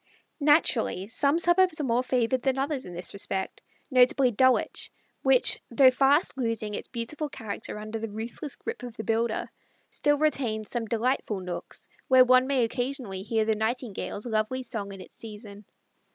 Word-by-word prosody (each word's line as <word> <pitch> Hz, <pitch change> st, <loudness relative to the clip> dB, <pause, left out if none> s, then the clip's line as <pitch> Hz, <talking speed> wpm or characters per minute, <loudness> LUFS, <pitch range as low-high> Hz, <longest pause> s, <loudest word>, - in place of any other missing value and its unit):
Naturally 285 Hz, -, +2 dB
some 280 Hz, +7 st, +1 dB
suburbs 345 Hz, -1 st, +3 dB
are -, -, -1 dB
more 245 Hz, -2 st, +1 dB
favored 250 Hz, 0 st, 0 dB
than 265 Hz, 0 st, 0 dB
others 275 Hz, -2 st, -2 dB
in 175 Hz, -, -9 dB
this 175 Hz, 0 st, -2 dB
respect, 195 Hz, -1 st, -3 dB, 0.3 s
notably 255 Hz, 0 st, +5 dB
Dulwich, 260 Hz, +3 st, +1 dB, 0.3 s
which, 265 Hz, -2 st, +4 dB
though 255 Hz, +2 st, +6 dB
fast 275 Hz, +3 st, +2 dB
losing 225 Hz, -3 st, -2 dB
its -, -, -5 dB
beautiful 275 Hz, +6 st, -4 dB
character 220 Hz, -5 st, -6 dB
under 215 Hz, +1 st, -5 dB
the 225 Hz, 0 st, -4 dB
ruthless 230 Hz, +7 st, -5 dB
grip 460 Hz, -, -6 dB
of 245 Hz, -2 st, -8 dB
the 220 Hz, -, -4 dB
builder, 225 Hz, 0 st, -1 dB, 0.4 s
still 290 Hz, 0 st, +1 dB
retains 250 Hz, -8 st, 0 dB
some 240 Hz, -2 st, -2 dB
delightful 230 Hz, -2 st, -1 dB
nooks 180 Hz, -1 st, -7 dB, 0.2 s
where 260 Hz, -1 st, +7 dB
one 255 Hz, +1 st, +5 dB
may 270 Hz, -3 st, +2 dB
occasionally 245 Hz, -4 st, -3 dB
hear 220 Hz, +2 st, 0 dB
the 220 Hz, -, +2 dB
Nightingale's 220 Hz, -1 st, -3 dB
lovely 230 Hz, +3 st, -1 dB
song 215 Hz, -5 st, -5 dB
in 195 Hz, -1 st, -9 dB
its -, -, -14 dB
season. 210 Hz, -2 st, -10 dB
240 Hz, 165 wpm, -27 LUFS, 215-265 Hz, 0.4 s, where